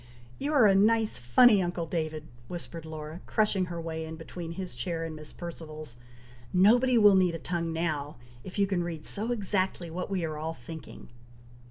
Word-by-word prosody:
"You 290 +2 -1
are 265 -7 +6
a 200 - +6
nice, 215 - +3
funny 200 - +6
uncle 175 -1 -2
David!" 155 -2 -3 0.2
whispered 170 -1 -7
Laura, 155 +1 -7
crushing 210 -3 +2
her 170 -1 -5
way 160 -1 -4
in 160 0 -6
between 165 +1 -7
his 185 -3 -5
chair 165 +7 -3
and 160 -1 -6
Miss 155 -1 -9
Perceval's, 155 -6 -8 0.6
"nobody 240 +7 +5
will 205 -2 +7
need 185 -3 +3
a - - -2
tongue 170 0 -2
now, 155 -3 -2 0.3
if 185 - -8
you 200 - +4
can 190 -3 0
read 165 -3 -5
so 220 +4 0
exactly 190 -5 -1
what 180 +3 -4
we 185 -4 -1
are 155 -1 -4
all 160 +1 -3
thinking." 155 +6 -10
170 Hz, 185 wpm, -29 LUFS, 160-195 Hz, 0.6 s, will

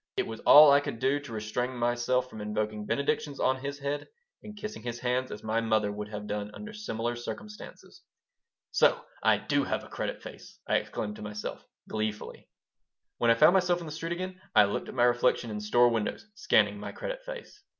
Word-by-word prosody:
It - - +1
was 115 0 -7
all 150 -1 +9
I 140 - +7
could 145 - -5
do 135 +4 +1
to 140 -4 -11
restrain 115 +4 -3
myself 120 +1 +1
from 110 -4 -9
invoking 105 0 -3
benedictions 140 0 -1
on 130 0 +2
his 140 +2 -5
head 140 +1 -3 0.3
and 210 0 -10
kissing 210 - -6
his 120 0 -5
hands 125 +1 0
as 105 - -8
my 110 +1 0
mother 110 -2 +1
would 105 0 -5
have 105 -1 -6
done 105 0 -3
under 210 0 -8
similar 120 - -3
circumstances 210 - -9 0.7
"So - - +3 0.2
I - - +4
do - - 0
have - - -2
a - - -13
'credit - - -4
face'!" - - -11
I - - +3
exclaimed 105 0 -4
to - - -10
myself, 105 0 -6 0.2
gleefully 110 -1 -4 0.7
When 120 - +3
I 115 - +6
found 155 +8 +6
myself 180 -2 +3
in 170 - -7
the 155 - -7
street 165 +2 -3
again 185 +1 -6
I - - +8
looked 100 - -2
at - - -8
my 120 - +3
reflection 120 -1 +2
in 105 - -4
store 120 +4 +4
windows, 115 - -2
scanning 215 - +2
my - - -6
"credit - - -5
face." - - -9
120 Hz, 200 wpm, -29 LUFS, 110-155 Hz, 0.7 s, all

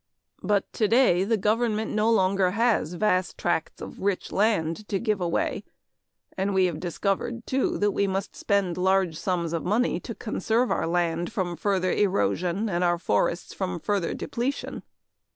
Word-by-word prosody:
But 205 -1 0
today 220 -4 +3
the 225 +3 +1
government 220 +1 0
no 215 +1 +2
longer 190 -3 +3
has 225 -8 +2
vast 185 -2 +1
tracts 175 -2 -2
of - - -9
rich 195 -1 -1
land 205 -2 0
to 200 - 0
give 210 -2 -1
away 170 -1 -1 0.7
and 195 +1 -1
we 190 -1 +4
have 170 -4 -2
discovered, 195 +6 -2
too, 265 0 0
that 205 0 +2
we 200 0 +1
must 195 0 -3
spend 200 -4 0
large 190 -2 +2
sums 170 -1 -2
of 165 - -2
money 220 +7 +1
to - - -7
conserve 235 +2 0
our - - 0
land 170 0 0
from 175 -3 -2
further 185 -1 0
erosion 180 - +1
and 180 -3 0
our 175 -1 +2
forests 170 - 0
from 185 -2 -3
further 195 0 -1
depletion. 260 +4 -3
190 Hz, 160 wpm, -26 LUFS, 175-215 Hz, 0.7 s, we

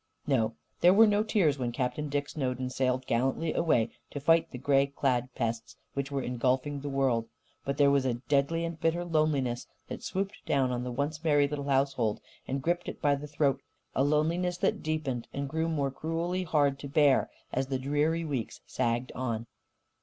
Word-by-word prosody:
No, 115 -5 +1 0.2
there 180 +2 +6
were 225 +2 +8
no 205 -1 +3
tears 180 -10 +2
when 120 -2 -1
Captain 130 +5 -2
Dick 145 0 -1
Snowden 130 -3 -2
sailed 130 0 0
gallantly 135 +8 0
away 120 -9 +2 0.2
to 145 - -5
fight 165 +3 +3
the - - -7
grey 135 +1 +3
clad 130 -3 0
pests 115 -1 -3 0.2
which 140 0 -2
were 140 -2 -2
engulfing 130 +3 0
the 145 +1 -5
world. 130 -4 +1 0.4
But 140 0 -2
there 140 -1 +5
was 140 -1 +3
a 130 -3 0
deadly 140 +6 0
and 165 -1 -5
bitter 170 +2 0
loneliness 150 -7 0 0.2
that - - -6
swooped 195 +2 -3
down 135 -3 +2
on 125 0 -2
the 125 - -4
once 145 +5 -2
merry 145 -3 +4
little 140 -1 -4
household 135 -5 +1 0.3
and 135 0 -2
gripped 175 +1 0
it - - -8
by 145 -2 +3
the 140 +1 -4
throat 140 -2 +1 0.3
a 135 - +2
loneliness 165 +5 +1
that - - 0
deepened 155 -6 -2
and 140 0 -2
grew 160 +3 -1
more 140 -4 0
cruelly 170 +5 -2
hard 145 -4 +2
to 140 - -6
bear 140 -1 +4 0.2
as 130 +1 0
the 135 -1 -1
dreary 150 +5 0
weeks 135 -7 -4
sagged 120 +1 -1
on. 115 -3 -3
140 Hz, 190 wpm, -29 LUFS, 130-155 Hz, 0.4 s, were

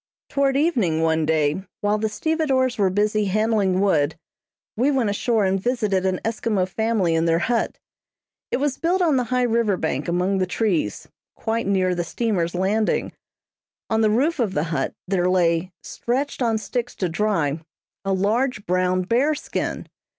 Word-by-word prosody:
Toward 275 -1 +1
evening 225 - +1
one 160 -1 +1
day, 155 +2 +1 0.2
while 205 +1 +1
the 220 0 0
stevedores 265 -2 0
were 195 -2 +3
busy 210 +2 +1
handling 205 -2 +1
wood, 160 -7 +2 0.6
we 250 +6 +2
went 255 -7 +1
ashore 220 0 +1
and 190 0 +1
visited 210 -6 0
an 185 -1 0
Eskimo 215 -4 0
family 210 -3 0
in 165 0 +1
their 165 0 +3
hut. 240 -1 0 0.7
It - - 0
was 280 0 -1
built 360 +2 +1
on 310 -6 +3
the 250 - +1
high 250 +1 0
river 230 -4 +1
bank 150 -4 -2
among 180 +3 +1
the 185 - +1
trees, 175 - -1 0.3
quite 225 -1 -2
near 185 -2 +2
the 175 -1 -1
steamer's 180 -3 -1
landing. 205 +4 0 0.8
On 220 0 +2
the 215 - +4
roof 280 +9 +1
of 215 -6 0
the 150 - +1
hut, 135 -3 -1
there 180 -1 +1
lay, 175 -1 +2
stretched 265 +4 -3
on 230 -2 +2
sticks 245 +2 -4
to 185 - -1
dry, 165 -5 0 0.4
a 195 - -1
large 210 +4 0
brown 185 +1 +1
bear 255 +10 +2
skin. 305 - -4
205 Hz, 165 wpm, -23 LUFS, 180-240 Hz, 0.8 s, the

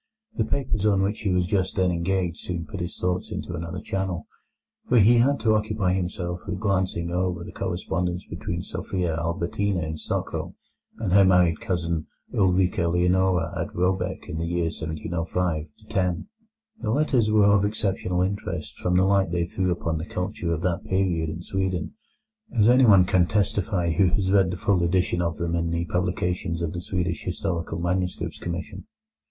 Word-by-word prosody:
The - - +1
papers 120 -7 -1
on 100 -2 +3
which 100 +3 -1
he 105 - -1
was 90 -1 +2
just 95 -1 0
then 95 -2 +2
engaged 90 0 -1
soon 85 -2 -4
put 80 +6 -7
his 85 0 -4
thoughts 90 0 -1
into - - -4
another 85 +1 -4
channel, 95 -4 -3 0.6
for 125 - +5
he 115 +3 +6
had 140 +4 +3
to 110 -1 +3
occupy 105 -3 +1
himself 90 -1 -2
with - - -3
glancing 95 -4 0
over 90 0 -1
the - - -8
correspondence 90 0 -2
between 85 +1 -4
Sophia 90 -4 -2
Albertina 85 +3 -1
in 80 0 -4
Stockholm - - -3 0.4
and 100 -5 -1
her 100 0 +7
married 90 -4 +4
cousin 85 -7 -2 0.3
Ulrica 95 -2 +2
Leonora 90 -1 +2
at - - -2
Råbäck 90 +1 0
in 85 -3 -4
the 85 - -2
years 85 -1 -1
1705 80 +1 -2 0.2
1710. 90 - -1 0.5
The 110 - -2
letters 125 -3 +2
were 105 -1 +5
of 100 -1 +5
exceptional 95 -3 0
interest 100 +2 -4
from 90 0 +1
the 95 - +4
light 100 -1 +3
they 85 0 0
threw 90 +1 -1
upon 85 -2 -1
the 80 - -5
culture 90 -1 -3
of 85 0 -2
that 85 -2 0
period 90 -4 0
in 85 +3 -6
Sweden, 95 -3 -2 0.6
as 105 -1 +5
anyone 120 -7 +7
can 90 -1 +3
testify 95 -3 +1
who 95 +3 +3
has 95 +1 +1
read 95 -2 +4
the 90 - -3
full 95 -1 +2
edition 90 0 +1
of 85 -1 -1
them 85 -1 -2
in 85 0 0
the 85 0 -1
publications 90 -1 -1
of 80 - -2
the 85 - -4
Swedish 90 -2 -2
Historical 90 -3 -3
Manuscripts 90 +1 -2
Commission. 85 - -5
90 Hz, 175 wpm, -25 LUFS, 85-95 Hz, 0.6 s, her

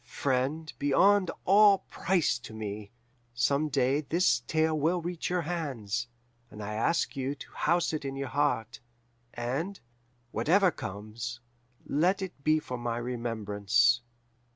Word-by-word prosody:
Friend 140 +5 -1
beyond 185 +7 +4 0.2
all 200 0 +6
price 170 -10 +1
to 115 -2 -10
me, 105 -1 -5 0.5
some 140 +5 +1
day 135 +1 +2
this 155 -5 +2
tale 160 0 +2
will 160 +4 +1
reach 175 0 -4
your 180 -1 0
hands, 125 - -3 0.4
and 105 -2 -9
I 105 +1 -4
ask 155 +10 0
you 135 +1 -2
to - - -12
house 170 +1 +1
it 155 -1 -2
in 135 -1 -4
your 135 -1 -4
heart, 140 -6 0 0.6
and, 140 +12 -3 0.5
whatever 185 +3 +3
comes, 110 +4 -6 0.5
let 180 +7 +1
it 175 -7 -8
be 155 +1 +4
for 125 -5 -5
my 120 -1 -2
remembrance. 120 -1 +1
140 Hz, 135 wpm, -29 LUFS, 120-165 Hz, 0.6 s, all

